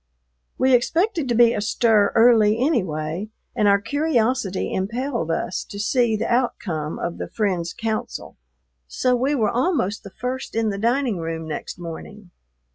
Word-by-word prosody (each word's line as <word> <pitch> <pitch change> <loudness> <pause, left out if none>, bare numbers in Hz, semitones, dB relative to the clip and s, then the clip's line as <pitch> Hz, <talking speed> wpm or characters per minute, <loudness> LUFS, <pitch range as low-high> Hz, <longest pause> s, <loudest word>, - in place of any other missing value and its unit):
We 260 0 +3
expected 325 - +1
to 240 - +1
be 235 0 +6
astir 215 -1 +2
early 225 -2 +5
anyway, 185 - -1 0.3
and 210 - +2
our 200 0 +5
curiosity 240 - 0
impelled 230 - -2
us 170 +2 -2
to 200 - -9
see 235 +1 +2
the 210 - -2
outcome 180 -11 -1
of 170 - -4
the - - -4
friend's 185 -6 -1
counsel, 225 -2 -4 0.5
so 250 - +1
we 265 +4 +1
were 220 -6 +1
almost 245 - 0
the 200 - -9
first 250 +6 -5
in 225 -1 +1
the 200 -1 -3
dining 235 -2 +1
room 165 -1 -4
next 155 - -5
morning. 175 +3 -9
220 Hz, 150 wpm, -22 LUFS, 190-250 Hz, 0.5 s, be